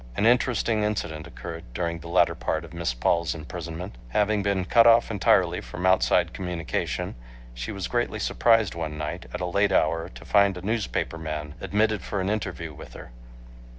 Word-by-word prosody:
An 105 - +1
interesting 120 -2 +3
incident 80 -7 -2
occurred 85 -1 -8
during 85 +1 -2
the 85 - -10
latter 85 +2 +3
part 80 +1 -2
of 85 - -13
Miss 85 -6 -1
Paul's 85 +8 +1
imprisonment. 85 +4 -7
Having 105 - +2
been 100 -2 0
cut 115 +5 +6
off 115 0 +5
entirely 100 -5 +3
from 90 - -6
outside 95 0 +3
communication, 90 -3 -3 0.4
she - - -5
was 95 -3 -4
greatly 120 -2 -1
surprised 115 -2 +3
one 80 -2 -4
night 80 +4 -5
at 90 - -5
a - - 0
late 100 +3 +2
hour 80 -2 +1
to - - -13
find 100 -2 +4
a 90 - -8
newspaper 105 -5 -2
man 75 -2 -5
admitted 110 -1 +1
for 100 - -3
an 95 +2 0
interview 90 -6 -3
with - - -11
her. - - -10
90 Hz, 180 wpm, -26 LUFS, 80-105 Hz, 0.4 s, cut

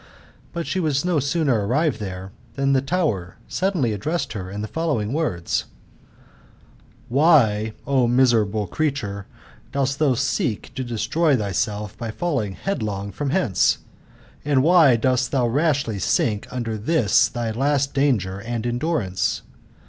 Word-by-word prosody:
But 170 -2 -4
she 190 - -2
was 150 -3 0
no 175 -4 +2
sooner 140 -5 +1
arrived 140 0 +1
there/tfaaniihe 115 +8 -3
tower 140 - -1
suddenly 175 - 0
addressed 155 - -2
her 95 -4 -5
in 100 +2 -5
fhe - - -3
following 140 -9 -1
wor&: 145 - -1 1.6
"Why, 120 -7 +3
O 130 -3 +2
miserable 115 -4 +3
creature, 105 - -2 0.4
dost 135 0 -1
thou 145 -5 +3
seek 120 -4 -1
to 130 - -3
destroy 140 +6 +1
thyself 105 0 -2
by 115 -2 -4
falling 120 - -2
headlong 105 - -3
from 145 +4 -3
whence? 135 - +2 0.7
And 140 -3 +2
Why 160 -6 +6
dost 125 +2 +1
thdti 120 -4 +1
rashly 140 -8 +1
sink 105 +3 +1
under 115 -3 -3
this 115 -3 +3
thy 115 0 -3
last 140 +3 0
danger 110 -10 +1
and 115 +2 -4
endurance 120 - -1
125 Hz, 130 wpm, -22 LUFS, 105-145 Hz, 1.6 s, Why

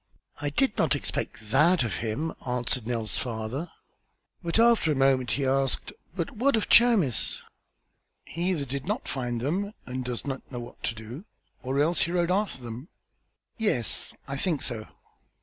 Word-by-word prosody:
"I 145 - 0
did 240 - +2
not - - +3
expect 115 -5 -3
that 155 +5 +5
of 110 -7 -2
him," 130 +9 -2
answered 125 -1 -1
Nell's 115 -3 -1
father. 120 +7 -3 0.7
But 170 +1 -1
after 230 -8 +5
a - - +1
moment 135 -2 +3
he 140 - 0
asked: 135 0 0 0.2
"But 170 -4 -2
what 260 +5 +2
of 220 - 0
Chamis?" 220 - +4 0.8
"He 175 +3 -2
either 160 -7 0
did 135 +1 -5
not - - -2
find 120 -3 -2
them 190 - -1
and 130 0 -4
does 125 -1 -4
not 135 -1 -5
know 125 - -4
what 120 - -10
to 115 - -1
do 115 - -8 0.4
or 130 +2 -2
else 165 +4 +3
rode 175 0 +1
after 195 -9 0
them." 120 +5 -7 0.7
"Yes, 130 - +1
I 140 - -3
think 155 -2 +1
so." 110 -3 -1
135 Hz, 165 wpm, -27 LUFS, 125-175 Hz, 0.8 s, that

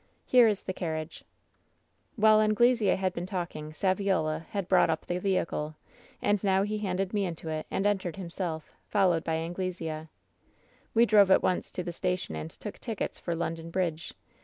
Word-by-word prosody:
Here 245 -2 +6
is 210 -3 0
the 185 - -3
carriage/ 160 -3 -4 0.9
"While 215 -1 +6
Anglesea 215 -1 +4
had 185 -1 -1
been 175 0 -4
talking, 175 -5 -4
Saviola 180 -3 0
had 200 -3 -3
brought 185 -2 +4
up 160 0 -1
the 175 0 -2
vehicle, 170 -5 -1 0.5
and 205 -1 +2
now 195 -1 +3
he 210 +1 -2
handed 195 -1 -2
me 205 -1 +1
into 165 -3 -4
it 155 0 -3
and 195 - -1
entered 195 -4 0
himself, 170 -4 -5 0.2
followed 180 -5 +2
by 160 - -1
Anglesea. 165 -2 -3 0.9
"We 230 +1 +6
drove 205 -4 +6
at 190 - +5
once 185 - 0
to 180 - -3
the 175 -1 -5
station 180 - -2
and 80 +1 -5
took 210 - -9
tickets 225 -5 -4
for 170 - -2
London 165 0 -3
Bridge. 165 -3 -2
185 Hz, 170 wpm, -29 LUFS, 165-200 Hz, 0.9 s, Here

